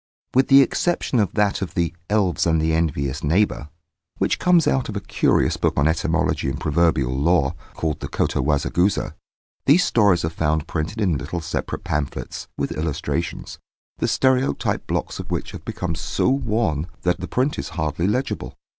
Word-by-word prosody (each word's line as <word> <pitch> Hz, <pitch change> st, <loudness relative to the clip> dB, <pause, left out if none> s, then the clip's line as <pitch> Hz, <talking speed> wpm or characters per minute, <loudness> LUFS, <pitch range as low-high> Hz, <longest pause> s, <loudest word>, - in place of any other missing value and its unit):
With 130 Hz, +1 st, +4 dB
the 135 Hz, 0 st, +8 dB
exception 155 Hz, -3 st, 0 dB
of 100 Hz, -5 st, +1 dB
that 105 Hz, -1 st, +1 dB
of 95 Hz, -, -4 dB
the 85 Hz, -2 st, 0 dB, 0.2 s
"Elves 100 Hz, -5 st, +1 dB
and 80 Hz, -1 st, +3 dB
the 80 Hz, +1 st, +1 dB
Envious 75 Hz, -3 st, -1 dB
Neighbour," 80 Hz, -1 st, +1 dB, 0.5 s
which -, -, 0 dB
comes 175 Hz, -3 st, +4 dB
out 130 Hz, -3 st, +1 dB
of 105 Hz, -, -5 dB
a -, -, -1 dB
curious -, -, +1 dB
book -, -, 0 dB
on 70 Hz, -, +3 dB
etymology 80 Hz, -3 st, 0 dB
and 70 Hz, -, -4 dB
proverbial 75 Hz, -5 st, +1 dB
lore, 70 Hz, 0 st, +2 dB, 0.2 s
called 80 Hz, -3 st, -2 dB
the -, -, -5 dB
Kotowazagusa, 75 Hz, +7 st, 0 dB, 0.5 s
these 165 Hz, +7 st, +6 dB
stories 100 Hz, -7 st, +3 dB
are -, -, 0 dB
found 80 Hz, -1 st, 0 dB
printed 85 Hz, +7 st, -3 dB
in 90 Hz, -9 st, +1 dB
little 75 Hz, +5 st, -4 dB
separate 85 Hz, +1 st, -4 dB
pamphlets, 75 Hz, -2 st, -3 dB
with -, -, -2 dB
illustrations, 75 Hz, -2 st, -3 dB, 0.4 s
the -, -, +1 dB
stereotype 130 Hz, 0 st, +1 dB
blocks -, -, -2 dB
of -, -, -7 dB
which -, -, -3 dB
have -, -, -9 dB
become 90 Hz, -2 st, -3 dB
so 80 Hz, -, 0 dB
worn 110 Hz, -, 0 dB, 0.2 s
that 90 Hz, 0 st, +1 dB
the 90 Hz, -, -5 dB
print 130 Hz, +4 st, 0 dB
is -, -, -4 dB
hardly 80 Hz, +2 st, 0 dB
legible. 125 Hz, +6 st, -2 dB
85 Hz, 170 wpm, -22 LUFS, 75-110 Hz, 0.5 s, the